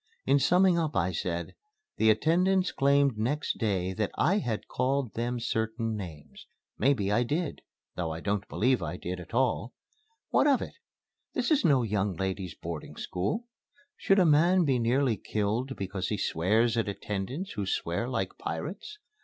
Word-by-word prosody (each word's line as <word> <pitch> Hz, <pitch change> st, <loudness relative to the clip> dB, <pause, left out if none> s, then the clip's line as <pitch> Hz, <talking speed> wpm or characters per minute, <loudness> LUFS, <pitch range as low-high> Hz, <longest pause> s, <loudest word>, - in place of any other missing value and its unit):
In 140 Hz, +2 st, +4 dB
summing 180 Hz, +5 st, +4 dB
up 155 Hz, -2 st, -1 dB
I 95 Hz, 0 st, +1 dB
said, 85 Hz, 0 st, -3 dB, 0.4 s
"The 110 Hz, -, +4 dB
attendants 180 Hz, -, +3 dB
claimed 140 Hz, -4 st, +3 dB
next 145 Hz, +7 st, -1 dB
day 95 Hz, -4 st, 0 dB
that 105 Hz, +2 st, -1 dB
I 195 Hz, +5 st, +3 dB
had 115 Hz, -, -3 dB
called 130 Hz, -2 st, -1 dB
them 120 Hz, +1 st, -2 dB
certain 115 Hz, -1 st, -1 dB
names. 80 Hz, -8 st, -9 dB, 0.3 s
Maybe 110 Hz, -6 st, +2 dB
I 105 Hz, -, +3 dB
did 150 Hz, +6 st, -2 dB, 0.3 s
though 90 Hz, -2 st, -2 dB
I 80 Hz, -, -5 dB
don't 100 Hz, +1 st, -2 dB
believe 125 Hz, +3 st, +1 dB
I 85 Hz, +4 st, -4 dB
did 90 Hz, +1 st, -5 dB
at 90 Hz, +6 st, -9 dB
all. 125 Hz, -1 st, 0 dB, 0.5 s
What -, -, +3 dB
of 275 Hz, -3 st, +4 dB
it? -, -, -6 dB, 0.6 s
This -, -, 0 dB
is 300 Hz, -2 st, +4 dB
no 135 Hz, -5 st, +4 dB
young 100 Hz, -3 st, 0 dB
ladies' 95 Hz, -1 st, -3 dB
boarding 85 Hz, -2 st, -7 dB
school. 100 Hz, -, -2 dB, 0.5 s
Should 195 Hz, -, +2 dB
a 185 Hz, -, +5 dB
man 170 Hz, +4 st, +4 dB
be 130 Hz, -4 st, +2 dB
nearly 120 Hz, 0 st, +2 dB
killed 110 Hz, +7 st, -2 dB
because 95 Hz, -1 st, -3 dB
he 105 Hz, -, -1 dB
swears 110 Hz, +7 st, +2 dB
at 115 Hz, -3 st, 0 dB
attendants 105 Hz, -, -4 dB
who 100 Hz, -3 st, -3 dB
swear 90 Hz, +6 st, -1 dB
like 110 Hz, -7 st, -3 dB
pirates? 180 Hz, -, -5 dB
115 Hz, 165 wpm, -29 LUFS, 95-140 Hz, 0.6 s, a